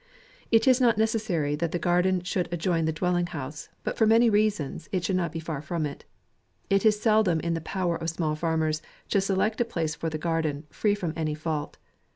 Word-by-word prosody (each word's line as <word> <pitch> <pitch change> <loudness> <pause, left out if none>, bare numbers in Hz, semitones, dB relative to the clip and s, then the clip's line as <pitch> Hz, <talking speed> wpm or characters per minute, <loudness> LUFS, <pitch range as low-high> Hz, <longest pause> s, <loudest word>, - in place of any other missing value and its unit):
It 225 +3 +4
is 260 0 +5
not 235 -4 +4
necessary 215 -10 0
that 165 +1 -1
the - - +1
garden 180 +1 +2
should 180 0 -1
adjoin 170 -1 0
the 160 - +1
dwelling 175 +2 0
house, 145 -2 -7
but - - -3
for 220 - +5
many 230 +1 +5
rea 210 +1 +4
sons, 155 -5 -6
it 185 -2 -1
should 190 - 0
not 170 -3 0
be 165 - -4
far 160 -3 -4
from 155 0 -2
it. 145 - -7 0.7
It 195 0 +3
is 210 -1 +3
seldom 215 -6 +3
in 170 0 -1
the 165 - -2
power 175 0 -1
of 165 - -3
small 160 -2 -1
farmers 160 -1 0 0.3
to 200 - +3
select 195 +4 0
a - - +3
place 165 -8 -2
for 165 +1 -3
the 155 - -3
garden, 160 -2 -1
free 205 -1 +1
from 175 -6 -3
any 155 -2 -1
fault. 155 -1 -3
170 Hz, 215 wpm, -27 LUFS, 160-200 Hz, 0.7 s, is